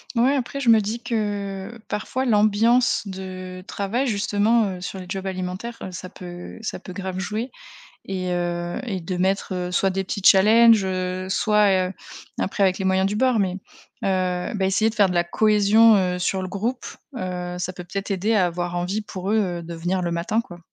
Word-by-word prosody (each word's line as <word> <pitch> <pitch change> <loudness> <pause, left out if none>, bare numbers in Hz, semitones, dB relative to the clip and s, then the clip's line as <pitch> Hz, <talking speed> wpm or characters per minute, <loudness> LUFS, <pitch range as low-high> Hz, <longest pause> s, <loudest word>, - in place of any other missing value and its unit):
Ouais, 255 +5 +3
après 270 +1 -3
je 250 - +1
me 225 -1 +7
dis 220 +3 -3
que: 205 -2 -3
«Parfois 245 +5 -2
l'ambiance 225 +2 +3
de 185 -1 -7
travail 220 +7 -2
justement, 210 -1 +1
heu, - - -10
sur 185 +1 -6
les 180 - -9
jobs 190 0 -4
alimentaires, 190 +5 -4
heu, 185 - -6
ça 185 0 -7
peut 175 +1 -9
ça 220 - -4
peut 185 0 -10
grave 190 -1 -5
jouer 215 +7 -3 0.6
et 185 -2 -2
heu 175 0 -2
et 200 -7 -3
de 180 +2 -4
mettre, 190 +1 0
heu, 180 0 -3
soit 190 +1 +2
des 190 +1 -1
petits 200 +2 -4
challenges, 220 +2 +7
heu, 185 0 -2
soit, 200 -2 +3
heu - - -6 0.5
après 195 +1 +1
avec 185 -1 +2
les 190 - -3
moyens 190 0 +2
du 205 - -1
bord, 255 0 +2
mais 190 -3 +1
heu, - - -5 1.0
bah, 190 - 0
essayer 215 +4 +2
de - - -12
faire 200 -3 +5
de 180 - -2
la 175 - +3
cohésion, 215 +4 +5
heu, 180 -2 +1
sur 190 +1 -1
le 185 - -4
groupe, 230 +7 -3 0.3
heu, 180 -3 -4
ça 185 - -2
peut 180 -1 -9
peut-être 195 +3 -5
aider 200 +4 +1
à 185 -4 +4
avoir 175 0 -3
envie 185 +5 -1
pour 190 -1 -5
eux, 220 - +3
heu, 175 -4 -1
de 170 0 -7
venir 180 +2 -1
le 170 - -1
matin», 170 +7 0
quoi. 175 -7 -11
195 Hz, 205 wpm, -23 LUFS, 185-215 Hz, 1.0 s, me